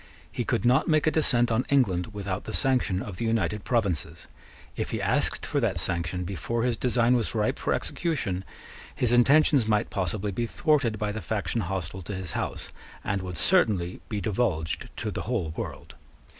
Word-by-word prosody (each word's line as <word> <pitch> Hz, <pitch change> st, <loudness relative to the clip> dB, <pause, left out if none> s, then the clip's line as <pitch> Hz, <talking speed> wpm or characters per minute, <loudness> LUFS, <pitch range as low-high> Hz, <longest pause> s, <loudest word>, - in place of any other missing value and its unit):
He -, -, -2 dB
could 95 Hz, -, 0 dB
not 125 Hz, +5 st, +4 dB
make 155 Hz, -2 st, +3 dB
a 155 Hz, -, +4 dB
descent 120 Hz, -7 st, +2 dB
on 115 Hz, +3 st, +2 dB
England 110 Hz, -9 st, +2 dB
without 100 Hz, -2 st, -4 dB
the -, -, -5 dB
sanction 125 Hz, -8 st, +1 dB
of 95 Hz, -3 st, -7 dB
the 115 Hz, -, -2 dB
United 110 Hz, -2 st, 0 dB
Provinces. 105 Hz, -, -1 dB, 0.5 s
If -, -, -3 dB
he -, -, -2 dB
asked -, -, +1 dB
for -, -, 0 dB
that -, -, 0 dB
sanction 90 Hz, 0 st, -1 dB
before 100 Hz, +6 st, -2 dB
his 125 Hz, -1 st, +1 dB
design 120 Hz, +1 st, +2 dB
was 120 Hz, -1 st, -1 dB
ripe 105 Hz, -1 st, 0 dB
for -, -, -1 dB
execution, 100 Hz, -, -1 dB, 0.5 s
his 120 Hz, -, +1 dB
intentions 135 Hz, 0 st, +5 dB
might 105 Hz, -1 st, +1 dB
possibly 100 Hz, +2 st, -1 dB
be 115 Hz, +5 st, -2 dB
thwarted 135 Hz, -5 st, +1 dB
by 105 Hz, 0 st, -1 dB
the 110 Hz, +2 st, -5 dB
faction 110 Hz, +1 st, -2 dB
hostile 95 Hz, -1 st, -4 dB
to 95 Hz, +3 st, -6 dB
his 95 Hz, -3 st, -3 dB
house, -, -, -4 dB, 0.3 s
and 95 Hz, 0 st, -1 dB
would 90 Hz, -2 st, -6 dB
certainly 105 Hz, -, +2 dB
be 105 Hz, -, -2 dB
divulged 95 Hz, -7 st, -1 dB
to -, -, -3 dB
the -, -, -3 dB
whole 100 Hz, -10 st, -2 dB
world. -, -, -6 dB
110 Hz, 185 wpm, -27 LUFS, 95-120 Hz, 0.5 s, intentions